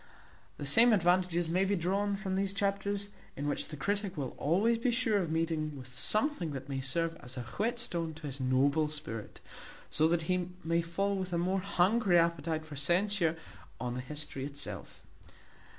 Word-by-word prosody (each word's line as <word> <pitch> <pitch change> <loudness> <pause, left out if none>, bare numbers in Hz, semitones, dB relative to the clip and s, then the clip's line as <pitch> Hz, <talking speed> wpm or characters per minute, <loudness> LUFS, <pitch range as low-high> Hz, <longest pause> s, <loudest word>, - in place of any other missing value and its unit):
The 145 - -5
same 225 - +7
advantages 175 -2 +2
may 180 +4 +2
be 200 +1 +1
drawn 200 +3 0
from 195 -2 -4
these 195 0 0
chapters, 200 0 -1 0.3
in 145 +1 -2
which 145 - 0
the 150 - -7
critic 200 +4 -2
will 135 -3 -2
be - - -19
always 230 - +2
sure 225 -4 +2
of 175 -4 -2
meeting 160 -2 -1
with 130 -1 -10
something 215 - +2
that 135 0 -6
may 135 -1 -3
serve 165 +5 0
as 125 +1 -9
a 125 - -3
whetstone 175 - -2
to 160 -1 -10
his 140 -1 -5
noble 140 +4 +2
spirit; 115 -8 -6 0.5
so 155 - +4
that 165 0 +1
he 180 +1 0
may 165 +1 +1
fall 195 +4 -1
with 185 -1 -3
a - - +1
more 185 +3 +1
hungry 195 0 +3
appetite 165 -2 +1
for 155 -2 -9
censure 175 +3 +2 0.4
on 125 -1 -3
the 125 - -3
history 145 0 -5
itself. 140 +1 -6
170 Hz, 180 wpm, -31 LUFS, 145-200 Hz, 0.5 s, same